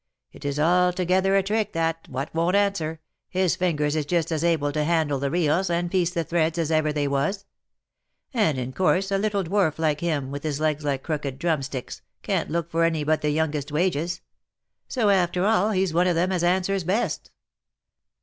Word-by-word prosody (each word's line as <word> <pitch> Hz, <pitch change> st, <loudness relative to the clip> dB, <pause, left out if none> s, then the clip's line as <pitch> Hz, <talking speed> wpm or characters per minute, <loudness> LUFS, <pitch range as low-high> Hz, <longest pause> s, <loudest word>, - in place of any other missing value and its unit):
It 145 Hz, -, -13 dB
is 140 Hz, +1 st, -2 dB
altogether 180 Hz, +3 st, +2 dB
a 195 Hz, -, +3 dB
trick 215 Hz, +1 st, -1 dB
that, 165 Hz, 0 st, -1 dB
what 135 Hz, +3 st, -4 dB
won't 170 Hz, +3 st, +1 dB
answer 170 Hz, -6 st, 0 dB
— -, -, -57 dB
his 185 Hz, -2 st, +1 dB
fingers 150 Hz, -4 st, 0 dB
is 150 Hz, -2 st, -1 dB
just 170 Hz, -1 st, 0 dB
as 160 Hz, -1 st, -1 dB
able 160 Hz, -4 st, +1 dB
to 150 Hz, +1 st, 0 dB
handle 155 Hz, -3 st, +1 dB
the 140 Hz, +1 st, -1 dB
reels, 175 Hz, +3 st, +1 dB
and 170 Hz, 0 st, -1 dB
piece 180 Hz, -3 st, +2 dB
the 170 Hz, -2 st, -2 dB
threads 165 Hz, 0 st, 0 dB
as 165 Hz, -2 st, -1 dB
ever 155 Hz, -1 st, +2 dB
they 145 Hz, -1 st, -1 dB
was; 155 Hz, +9 st, -1 dB, 0.9 s
and 185 Hz, -, +2 dB
in 130 Hz, 0 st, -4 dB
course, 190 Hz, +4 st, +1 dB
a 195 Hz, -, +2 dB
little 205 Hz, -1 st, 0 dB
dwarf 180 Hz, -3 st, +1 dB
like 155 Hz, -2 st, 0 dB
him, 150 Hz, -6 st, -2 dB
with 140 Hz, 0 st, -5 dB
his 150 Hz, -2 st, -3 dB
legs 155 Hz, -1 st, 0 dB
like 140 Hz, -2 st, -1 dB
crooked 145 Hz, -4 st, -3 dB
drumsticks, 140 Hz, -5 st, -3 dB, 0.2 s
can't -, -, -1 dB
look 170 Hz, +1 st, -2 dB
for 165 Hz, +1 st, +2 dB
any 165 Hz, -2 st, +1 dB
but 155 Hz, +1 st, +1 dB
the 150 Hz, -, 0 dB
youngest 150 Hz, -1 st, -1 dB
wages; 170 Hz, +1 st, 0 dB, 0.7 s
so 230 Hz, -5 st, +1 dB
after 180 Hz, -1 st, +2 dB
all, 215 Hz, -1 st, +3 dB
he's 190 Hz, -4 st, 0 dB
one 175 Hz, +2 st, +3 dB
of 175 Hz, -, +2 dB
them 180 Hz, +3 st, +1 dB
as 180 Hz, -2 st, 0 dB
answers 185 Hz, +2 st, +1 dB
best." 195 Hz, +8 st, -1 dB
165 Hz, 195 wpm, -24 LUFS, 150-185 Hz, 0.9 s, a